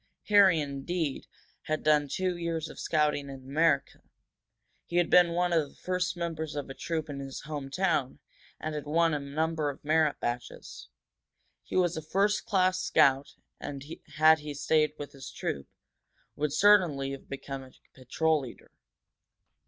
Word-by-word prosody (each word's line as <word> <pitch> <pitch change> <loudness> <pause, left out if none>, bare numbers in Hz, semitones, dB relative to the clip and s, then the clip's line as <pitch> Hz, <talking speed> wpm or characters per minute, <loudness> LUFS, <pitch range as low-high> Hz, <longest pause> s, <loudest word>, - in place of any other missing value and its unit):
Harry, 195 -5 +6
indeed, 145 +2 -3 0.4
had 155 0 -2
done 150 -1 +3
two 180 +6 -1
years 165 -2 -3
of - - -11
scouting 150 -2 0
in 135 - -7
America; 145 +1 +1 0.9
he 170 - -6
had 175 -1 +2
been 175 -1 +6
one 175 0 +1
of 155 -4 +1
the - - -21
first 180 -1 -2
members 160 -3 -4
of 145 -2 -4
a - - -5
troop 160 +1 -3
in 140 -2 -6
his 135 -1 -7
home 145 -3 -6
town, 160 -5 0 0.4
and 155 - -4
had 150 -1 -5
won 165 +2 +2
a 150 - 0
number 155 +2 -1
of 145 - -9
merit 155 -1 +2
badges. 120 - -5 0.7
He - - -8
was 180 -2 +2
a - - -3
first 200 +6 0
class 185 -3 +2
scout, 135 -5 +3 0.2
and, 140 -1 -7 0.3
had 155 +1 +6
he 150 -1 -7
stayed 150 +1 +2
with 145 - -7
his 135 -1 -10
troop, 70 - -4 0.7
would 150 0 -1
certainly 160 -6 +4
have 135 - -9
become 135 0 -6
a 130 -1 -13 0.2
patrol 155 +4 0
leader. 125 -3 -11
155 Hz, 160 wpm, -29 LUFS, 140-170 Hz, 0.9 s, Harry